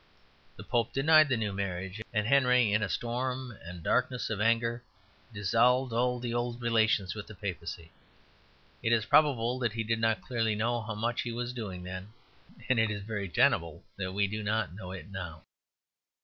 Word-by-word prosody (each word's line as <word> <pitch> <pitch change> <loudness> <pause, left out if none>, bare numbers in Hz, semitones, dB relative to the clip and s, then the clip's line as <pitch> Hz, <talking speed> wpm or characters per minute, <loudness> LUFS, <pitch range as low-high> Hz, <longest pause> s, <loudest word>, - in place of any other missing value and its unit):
The - - -10
Pope 115 -2 0
denied 155 +2 +6
the 130 - +2
new 105 -3 -2
marriage; 95 +1 -4
and 105 -2 0
Henry, 125 -3 +4
in 105 - +3
a 105 - -1
storm 125 - -2
and 85 0 -9
darkness 125 +2 0
of 105 -1 -2
anger, 115 +1 +2 0.5
dissolved 115 +5 +2
all 125 +1 +1
the 120 -1 -3
old 120 0 -2
relations 110 -5 +2
with 105 -1 -7
the 110 - -10
Papacy. 85 -4 -6 0.9
It 115 - +2
is 110 -2 +2
probable 130 -5 +3
that 120 -4 0
he 115 0 -2
did 115 +1 0
not 110 -4 +1
clearly 115 0 0
know 120 +2 0
how 110 0 -5
much 115 +3 -1
he 120 - -4
was 120 +1 -3
doing 100 -7 -6
then; 95 +3 -7 0.5
and 130 -3 +3
it 110 0 +3
is 100 -2 -4
very 105 -2 -4
tenable 85 - +2
that 95 -1 -3
we 100 +1 +2
do 105 +2 -3
not 110 -3 -1
know 95 -1 -8
it 95 +2 -8
now. 85 -5 -7
110 Hz, 185 wpm, -30 LUFS, 100-120 Hz, 0.9 s, denied